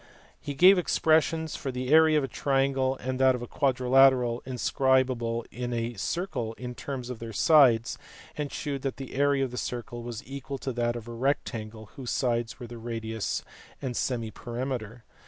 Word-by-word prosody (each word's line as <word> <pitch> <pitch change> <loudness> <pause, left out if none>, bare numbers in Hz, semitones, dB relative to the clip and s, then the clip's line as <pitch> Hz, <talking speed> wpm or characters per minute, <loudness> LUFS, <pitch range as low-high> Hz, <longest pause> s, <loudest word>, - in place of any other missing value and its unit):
He 145 - -6
gave 185 +5 +7
expressions 160 -1 +2
for 135 - -4
the 125 0 -4
area 160 0 +6
of 150 - +2
a - - -1
triangle 135 -1 +1
and 130 0 -3
of 130 -2 +4
a - - -6
quadrilateral 130 -2 +3
inscribable 125 -2 +1
in 125 0 -4
a 115 0 -2
circle 120 - -3
in 125 +1 -7
terms 125 -1 -5
of 120 - -7
their 115 -1 -6
sides; 125 -4 +4 0.4
and 150 -2 -3
shewed 140 -3 -4
that 135 -1 -3
the 135 -2 -8
area 140 0 +2
of 125 - -8
a - - -5
circle 120 0 -4
was 120 -2 -7
equal 135 +1 -6
to 130 0 -4
that 120 0 0
of 120 -1 -7
a 120 - -6
rectangle 115 -4 -3
whose 130 -4 -6
sides 120 -2 -1
were 125 - -6
the 120 0 -9
radius 115 -2 -3 0.4
and 130 -3 -3
semiperimeter. 120 -1 -3
125 Hz, 175 wpm, -28 LUFS, 120-135 Hz, 0.4 s, gave